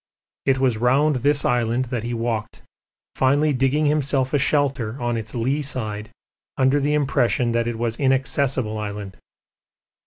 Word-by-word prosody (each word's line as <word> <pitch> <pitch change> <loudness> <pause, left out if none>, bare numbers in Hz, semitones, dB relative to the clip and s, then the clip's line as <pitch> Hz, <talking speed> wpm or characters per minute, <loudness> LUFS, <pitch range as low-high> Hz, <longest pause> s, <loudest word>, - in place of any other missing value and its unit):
It 135 -1 +4
was 130 -4 +1
round 135 +4 +3
this 145 +3 +1
island 120 +1 +1
that 120 - -1
he 120 +2 -4
walked, 115 -2 -3 0.5
finally 145 +3 +2
digging 135 +4 +1
himself 140 -3 +1
a 145 - +3
shelter 135 -4 0
on 120 -1 -1
its 110 0 -5
lee 130 +6 0
side 110 -7 -4 0.5
under 135 +1 +3
the 145 +1 +1
impression 125 -4 +1
that 115 0 0
it 120 -1 -3
was 115 0 -2
Inaccessible 130 -4 0
Island. 105 -2 -6
130 Hz, 150 wpm, -22 LUFS, 115-140 Hz, 0.5 s, It